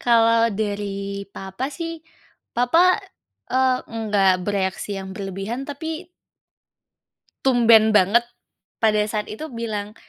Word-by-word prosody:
Kalau 230 -1 +4
dari 200 -1 -3
papa, 195 +6 -5
sih, 330 +2 -6 0.6
papa, 330 +10 +4 0.5
eee, 255 0 +3
enggak 210 -4 +2
bereaksi 200 0 -2
yang 190 0 -7
berlebihan 195 +6 -5
tapi 320 +4 -5 1.4
tumben 230 -4 +6
banget 210 +3 +4 0.6
pada 215 -1 +4
saat 215 -1 -3
itu 220 +9 -6
bilang, 220 -5 -5
220 Hz, 100 wpm, -22 LUFS, 200-255 Hz, 1.4 s, tumben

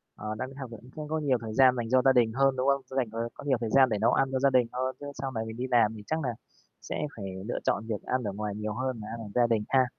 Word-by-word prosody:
Ờ, 105 0 -5
đang 130 +3 -4
đi 135 - -13
học 130 - -6
thì 115 - -7
cũng 125 +2 -16
không 155 -1 -5
có 160 +1 -1
nhiều 140 -4 +2
thời 110 -1 -5
gian 130 +1 +6
dành 115 -2 -3
cho 130 - +5
gia 135 - +7
đình 120 -3 +4
hơn, 135 0 +3
đúng 130 +1 0
không? 140 0 +3
Sẽ 130 - -8
dành, 125 -3 +2
ờ 115 +1 -3
có - - -11
nhiều 135 -4 +2
thời 115 - -1
gian 130 +2 +6
để 110 - 0
nấu 115 - +4
ăn 135 - +2
cho 130 - 0
gia 140 - +4
đình 125 -3 +3
hơn, 130 +1 -1
chứ 145 - -8 0.2
sau 135 -1 -2
này 110 -2 -2
mình 110 +1 -7
đi 130 +1 -2
làm 120 -4 +4
thì 105 - -9
chắc 160 - 0
nà 135 -5 -1 0.5
sẽ - - -5 0.2
phải 100 - -5 0.2
lựa 120 - -2
chọn 110 +2 0
việc 105 -3 -3
ăn 130 -1 -1
ở 100 - -2
ngoài 105 0 -3
nhiều 105 0 -3
hơn 130 0 -2
nà 105 - -7
ăn 115 - -6
ở 115 - -7
gia 120 -1 +4
đình 115 -2 +1
ha? 130 -1 +4
125 Hz, 345 wpm, -28 LUFS, 110-130 Hz, 0.5 s, gia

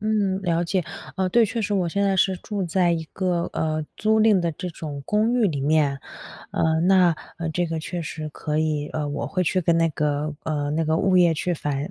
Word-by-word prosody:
嗯， 205 -3 0
了 170 -2 +1
解。 180 +1 0 0.3
呃， 190 -1 +1
对， 230 +4 +4
确 230 +2 -3
实 205 - -2
我 185 -4 +1
现 200 +4 -1
在 195 -1 +2
是 190 0 +2
住 200 -1 -3
在 175 0 +2
一 165 -1 -1
个， 180 -3 -1
呃， 155 -1 -1
租 220 +1 +2
赁 215 -3 +5
的 170 -1 0
这 180 +4 -6
种 150 -3 -7
公 215 +3 +2
寓 240 -3 +3
里 150 -7 -2
面。 145 -1 +2 0.5
呃， 160 0 +1
那 180 -1 +4 0.2
呃， 165 -1 -3
这 175 +3 0
个 165 0 -3
确 170 +2 -4
实 155 0 -5
可 150 0 -3
以 155 -2 0
呃， 150 -2 -2
我 145 - -3
会 185 -2 -1
去 185 +2 +1
跟 170 -1 +2
那 165 0 +3
个 150 0 -1
呃， 145 -2 -2
那 160 +2 0
个 160 +1 +1
物 185 +2 +2
业 175 -2 +5
去 175 +3 -1
反 145 -2 -3
170 Hz, 240 characters per minute, -24 LUFS, 155-190 Hz, 0.5 s, 赁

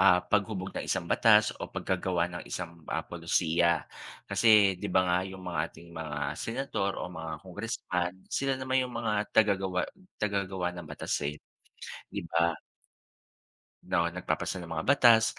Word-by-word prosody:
ah, 90 -2 +6
paghubog 100 -1 0
ng - - -4
isang - - 0
batas 105 +3 +5
o - - -4
paggagawa 90 -2 0
ng 85 - -5
isang, 85 -2 -5
ah, - - -1
pulisiya, 85 0 +1 0.4
kasi 105 -5 +5
di 105 - -3
ba 95 0 +4
nga 90 0 +2
yung 95 -1 -9
mga 85 -3 -1
ating 85 0 -15
mga 80 -2 -5 0.2
senador 115 -5 -2
o - - -3
mga 80 -2 -5
congressman, 90 -2 -2 0.2
sila 135 -1 +1
naman 130 0 +1
yung 125 -1 -3
mga 110 -2 0 0.2
tagagawa 95 -4 +2 0.3
tagagawa 95 -3 -1
ng 85 -3 -8
batasin, 75 +1 -2 0.7
di - - -5
ba? 85 0 +3 1.3
'No, 85 -2 +2
nagpapasa 90 +1 -2
ng 85 - -7
mga 80 - -1
batas 120 -4 +6
95 Hz, 150 wpm, -30 LUFS, 85-105 Hz, 1.3 s, ah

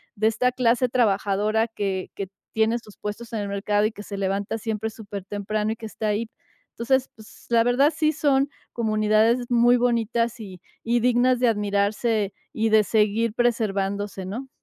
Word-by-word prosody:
de 215 +1 +2
esta 240 +3 +1
clase 250 0 +2
trabajadora 215 -1 +1
que 195 -4 -3
que 195 - -4 0.3
tiene 220 +1 +2
sus 210 -3 -17
puestos 225 +3 -6
en 220 - -1
el 205 - -3
mercado 205 +1 +1
y 215 - 0
que 205 - -9
se 200 -1 -7
levanta 195 +3 -1
siempre 220 0 -3
súper 205 -3 -8
temprano 210 +2 -2
y - - -9
que 225 - -9
está 215 0 -4
ahí. 215 +2 -1 0.4
Entonces, 260 +3 0
pues, 220 -1 -16
la 230 -1 +4
verdad 270 +6 +3
sí 310 -1 +2
son 280 -2 +2 0.2
comunidades 220 +2 +2
muy 240 +1 +5
bonitas 235 -1 0
y 190 -5 -9 0.2
y 235 +1 +1
dignas 250 +1 +3
de 245 - +3
admirarse 205 0 0 0.2
y 225 0 0
de 215 0 +5
seguir 215 +2 +1
preservándose, 205 -5 -1
¿no? 240 +8 -6
220 Hz, 170 wpm, -24 LUFS, 205-235 Hz, 0.4 s, muy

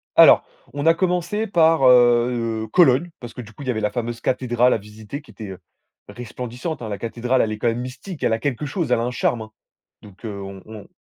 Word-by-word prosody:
Alors - - +8 0.3
on 145 +1 -3
a 165 - +6
commencé 180 +4 -1
par 165 -5 +3
heu, 120 -2 +3
Cologne, 170 -1 +4
parce 120 -1 -9
que - - -7
du 110 -1 -13
coup 140 - -10
il - - -9
y - - +2
avait 110 -2 -3
la 105 - 0
fameuse 120 -1 -4
cathédrale 125 -1 +2
à - - +1
visiter 105 +6 -9
qui 145 - -17
était 100 -4 -8 0.5
resplendissante, 125 +5 -6
hein, 110 - -5
la 100 - -4
cathédrale, 120 +3 0
elle 110 - 0
est 110 - -4
quand 120 - 0
même 115 +1 0
mystique, 135 +7 -8
elle - - +2
a 115 - 0
quelque 140 +2 -2
chose, 150 -1 -3
elle 125 - +3
a - - -1
un 120 - -2
charme 120 -1 0
hein. 110 - -14 0.5
Donc, 100 +2 -14
heu, 105 -2 -5
on 95 -1 -9
on 110 -2 -11
120 Hz, 235 wpm, -22 LUFS, 110-140 Hz, 0.5 s, Alors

